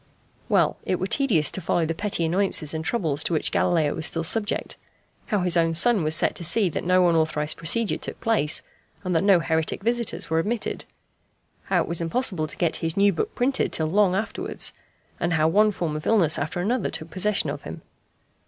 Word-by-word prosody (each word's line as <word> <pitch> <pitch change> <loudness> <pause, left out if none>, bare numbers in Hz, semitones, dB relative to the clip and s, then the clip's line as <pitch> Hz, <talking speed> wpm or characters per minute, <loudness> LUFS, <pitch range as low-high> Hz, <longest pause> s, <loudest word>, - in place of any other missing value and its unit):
Well, - - +2
it 185 - -2
were 185 - -1
tedious 195 - +1
to 190 - -4
follow 165 0 0
the 165 - -2
petty 190 -2 -1
annoyances 170 -3 +2
and 160 0 -3
troubles 160 -8 -1
to - - -2
which 155 - 0
Galileo 160 -4 +1
was 160 - -2
still 165 - -2
subject 205 +5 -1 0.5
how 205 -3 0
his 180 -1 +3
own 165 -1 +2
son 215 +4 +4
was 155 +1 +1
set - - +3
to - - -5
see 185 +4 +2
that - - -4
no 180 0 +3
unauthorized 155 -2 0
procedure 205 +8 0
took - - -7
place, 210 -10 +1 0.4
and 180 -1 -2
that 165 - +2
no 195 -3 +5
heretic 160 +3 -1
visitors 235 0 0
were 160 0 0
admitted; 215 +7 -3 0.8
how - - +1
it - - -9
was 170 0 -1
impossible 170 -2 0
to - - -8
get 170 -3 0
his 165 +1 -3
new 200 0 +4
book 165 - -3
printed 265 +2 0
till 160 - +1
long 185 +3 +2
afterwards; 215 +3 -2 0.5
and 170 0 -1
how 155 -1 +2
one 210 +6 +4
form 170 -6 -3
of 155 - -5
illness 180 -9 +3
after 155 +4 -3
another 230 +4 -1
took 160 +1 -6
possession 200 +2 0
of - - -7
him. - - -9
175 Hz, 205 wpm, -24 LUFS, 160-205 Hz, 0.8 s, no